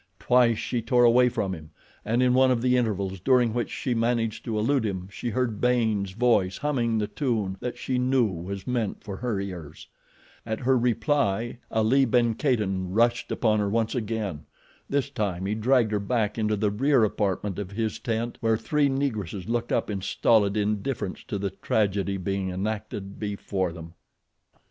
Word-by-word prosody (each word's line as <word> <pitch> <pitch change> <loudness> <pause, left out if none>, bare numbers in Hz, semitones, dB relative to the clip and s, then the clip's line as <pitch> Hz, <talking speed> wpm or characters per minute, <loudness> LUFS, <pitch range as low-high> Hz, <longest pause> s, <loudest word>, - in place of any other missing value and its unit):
Twice 125 -2 +3
she 120 +1 -2
tore 120 +2 +3
away 125 +1 +6
from 95 -5 -2
him, 80 -3 -9 0.3
and 115 +4 +1
in 125 -1 +4
one 130 +1 +5
of 125 -2 +2
the 125 0 +3
intervals 100 -6 -1
during 120 +2 +3
which 120 0 -1
she 125 - -2
managed 115 -1 0
to 110 -2 -2
elude 130 +4 +2
him 95 -4 -3
she 120 - -4
heard 115 -3 -1
Baynes' 110 -6 +1
voice 105 -5 +2
humming 120 -6 0
the 105 - 0
tune 110 -7 -1
that 125 - -4
she 130 -1 -1
knew 130 -1 +3
was 95 0 -5
meant 120 -5 -2
for 100 -3 -6
her 115 -5 -2
ears. 90 -6 -7 0.6
At 110 +1 -4
her 130 +1 +3
reply 120 -2 0
Ali 115 +5 +3
ben 120 -1 +2
Kadin 105 -9 0
rushed 120 +4 +1
upon 110 -2 +2
her 100 -1 0
once 115 +1 0
again. 105 - -3 0.4
This 140 -2 0
time 95 -3 -2
he 100 - 0
dragged 115 +1 +2
her 105 - +1
back 105 0 0
into 110 -1 0
the 105 0 0
rear 130 +3 +3
apartment 100 -1 -1
of 100 -3 -4
his 110 +1 -3
tent 115 0 -3
where 115 -1 +2
three 145 +5 +1
Negresses 110 - -2
looked 120 0 -1
up - - +1
in 100 -2 -3
stolid 105 +1 +2
indifference 105 0 -2
to 110 -6 -3
the 100 -1 -2
tragedy 100 0 0
being 95 0 -2
enacted 100 +1 -4
before 100 -3 -2
them. 80 0 -10
110 Hz, 175 wpm, -26 LUFS, 100-120 Hz, 0.6 s, away